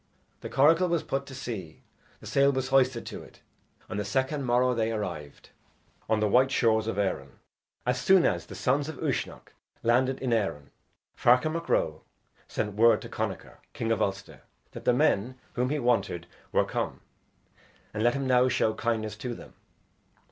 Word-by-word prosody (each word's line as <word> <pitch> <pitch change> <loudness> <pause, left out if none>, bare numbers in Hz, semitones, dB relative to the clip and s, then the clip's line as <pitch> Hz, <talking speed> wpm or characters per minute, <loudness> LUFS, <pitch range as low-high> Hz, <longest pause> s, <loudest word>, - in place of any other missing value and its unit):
The - - -7
coracle 165 +6 +4
was 170 -2 0
put 135 0 -3
to 135 - -9
sea, 100 - -7 0.4
The - - -12
sail 140 0 +3
was 130 -1 -2
hoisted 130 -3 +2
to - - -7
it; - - -16 0.5
And 105 - -4
the - - -1
second 130 +7 -1
morrow 125 +1 +3
they 115 -1 0
arrived 85 -10 -6 0.6
On 110 -1 +2
the 105 - +2
white 125 +6 +4
shores 110 -4 +2
of 115 - -2
Erin. 95 -9 -2 0.5
As 125 +1 0
soon 190 -2 +5
as - - 0
the - - -9
sons 140 +3 0
of 160 - -7
Uisnech - - -3 0.3
landed 130 +3 +2
in 125 -3 0
Erin, 95 -11 -1 0.4
Ferchar 125 +6 +4
Mac 165 +1 -4
Ro 80 0 +1 0.5
sent 105 - -3
word 115 +3 +5
to - - -8
Connachar, - - -5
king 115 - -2
of 115 - +1
Ulster, 100 0 -3 0.3
that - - -10
the 125 - +4
men 125 -3 +2 0.2
whom 125 +1 0
he 150 - 0
wanted 100 - 0 0.3
were - - +3
come, - - -3 0.9
and 105 - -3
let 120 +3 +3
him 135 -1 -2
now 125 -1 +4
show 115 -3 +1
kindness 110 -2 -2
to 120 +2 -5
them. - - -13
120 Hz, 175 wpm, -28 LUFS, 105-135 Hz, 0.9 s, soon